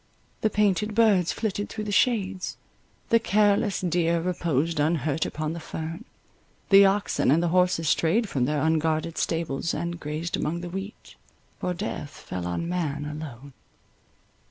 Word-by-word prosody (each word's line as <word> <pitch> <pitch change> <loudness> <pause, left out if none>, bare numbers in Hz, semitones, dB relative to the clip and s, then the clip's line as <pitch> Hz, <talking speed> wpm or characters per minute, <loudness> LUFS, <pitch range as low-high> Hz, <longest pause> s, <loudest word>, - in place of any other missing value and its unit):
The 220 - +3
painted 210 0 +1
birds 205 -6 +4
flitted 205 -2 -2
through 215 - -5
the 210 - -4
shades; 200 -4 +1 0.5
the 230 - +5
careless 205 -1 +2
deer 170 -1 +1
reposed 165 -3 -1
unhurt 155 0 +1
upon 155 +1 -3
the 170 - -5
fern—the 165 +5 -1
oxen 200 -6 +1
and 160 +5 +4
the 175 - +1
horses 180 -2 +2
strayed 205 +10 +2
from 130 -9 0
their 150 +2 0
unguarded 160 0 0
stables, 165 -1 -1
and 170 0 -3
grazed 155 +3 -3
among 170 +3 -2
the 175 - -6
wheat, 195 +3 -7 0.5
for 180 0 -2
death 145 -3 -4
fell 90 -1 -5
on 90 - -2
man 155 -5 -2
alone. 145 -3 -8
170 Hz, 145 wpm, -26 LUFS, 155-195 Hz, 0.5 s, the